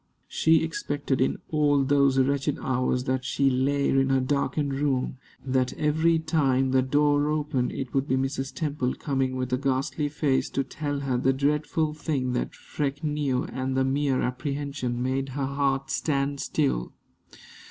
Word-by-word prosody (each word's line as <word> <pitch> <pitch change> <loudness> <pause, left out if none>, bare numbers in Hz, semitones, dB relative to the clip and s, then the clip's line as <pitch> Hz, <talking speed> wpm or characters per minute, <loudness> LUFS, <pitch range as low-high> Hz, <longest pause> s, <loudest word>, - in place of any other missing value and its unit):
She 160 0 +3
expected, 145 -4 -2
in 130 - +1
all 145 -2 +3
those 140 -1 +3
wretched 140 +1 +1
hours 125 -1 0
that 130 0 -1
she 135 +1 +1
lay 140 +2 +1
in 135 0 +2
her 135 0 +3
darkened 140 +1 0
room, 135 -2 -1 0.3
that 130 -1 +1
every 160 +2 +2
time 140 -5 +1
the 130 0 +4
door 145 +2 +2
opened 150 -4 0
it 130 -2 -5
would 135 +1 +1
be 130 - +2
Mrs. 135 0 -2
Temple 145 -5 -2
coming 135 -2 -1
with 130 -1 -2
a 125 - +1
ghastly 140 +2 -1
face 140 -2 0
to 135 - -1
tell 145 +1 -4
her 130 -3 0
the 135 +1 +2
dreadful 150 +3 0
thing 140 -5 -2
that 125 - -2
Freke 145 +1 -4
knew; 145 -4 0
and 130 +2 -3
the 130 - +3
mere 135 0 +1
apprehension 130 -1 -3
made 135 +1 -1
her 135 +1 -2
heart 135 0 -1
stand 140 -1 0
still. 135 - -1
135 Hz, 165 wpm, -26 LUFS, 130-145 Hz, 0.3 s, the